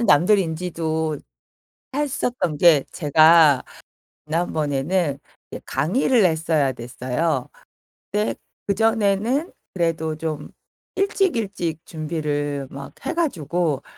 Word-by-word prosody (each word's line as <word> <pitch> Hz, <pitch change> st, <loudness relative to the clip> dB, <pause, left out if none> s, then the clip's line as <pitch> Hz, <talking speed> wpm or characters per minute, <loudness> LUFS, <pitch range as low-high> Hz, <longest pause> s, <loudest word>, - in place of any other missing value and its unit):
사실은 235 Hz, -, +1 dB
남들이 185 Hz, +7 st, +5 dB
인지도 160 Hz, -2 st, -2 dB, 0.8 s
했었던 250 Hz, -, -1 dB
게 160 Hz, -5 st, +6 dB
제가 155 Hz, -2 st, +5 dB, 0.6 s
지난번에는 155 Hz, -1 st, 0 dB, 0.3 s
이제 -, -, -7 dB
강의를 230 Hz, -, +2 dB
했어야 160 Hz, -4 st, +2 dB
됐어요. 130 Hz, +4 st, -2 dB, 0.6 s
근데 210 Hz, +1 st, 0 dB, 0.3 s
그전에는 225 Hz, -, +1 dB, 0.2 s
그래도 165 Hz, -3 st, -1 dB
좀 155 Hz, -2 st, -4 dB, 0.5 s
일찍 390 Hz, -, +1 dB
일찍 175 Hz, -7 st, -3 dB
준비를 145 Hz, -3 st, -3 dB
막 140 Hz, 0 st, -9 dB
해 -, -, -1 dB
가지고 170 Hz, -, -1 dB
165 Hz, 230 characters per minute, -22 LUFS, 150-200 Hz, 0.8 s, 게